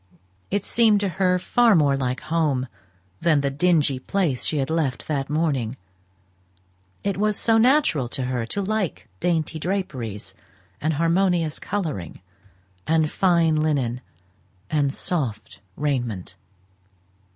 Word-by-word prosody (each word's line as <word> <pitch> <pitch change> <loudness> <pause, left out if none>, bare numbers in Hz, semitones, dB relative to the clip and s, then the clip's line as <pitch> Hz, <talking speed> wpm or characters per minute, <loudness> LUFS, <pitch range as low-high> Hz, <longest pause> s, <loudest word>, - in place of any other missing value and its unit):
It 200 0 -1
seemed 220 -3 +4
to 200 - 0
her 180 0 +1
far 230 +4 +3
more 145 -4 +4
like 130 -2 -2
home 155 -5 0 0.5
than 155 -4 +3
the 140 0 0
dingy 150 -3 +2
place 150 -4 -1
she 155 - 0
had 135 +1 -1
left 150 -7 -1
that 140 -3 -2
morning; 140 -6 -1 1.3
it 200 -2 -1
was 210 0 +1
so 225 -1 +3
natural 245 - +3
to 130 +2 -4
her 125 -2 -2
to 200 +12 -2
like 190 - -2
dainty 160 -2 0
draperies, 140 - -4 0.5
and 155 +2 +1
harmonious 170 0 +1
colouring, 160 - -4 0.7
and 160 -1 +2
fine 170 -4 +3
linen, 135 -6 0 0.7
and 145 -3 +2
soft 125 - -2 0.2
raiment. 120 -10 -2
155 Hz, 125 wpm, -23 LUFS, 135-180 Hz, 1.3 s, seemed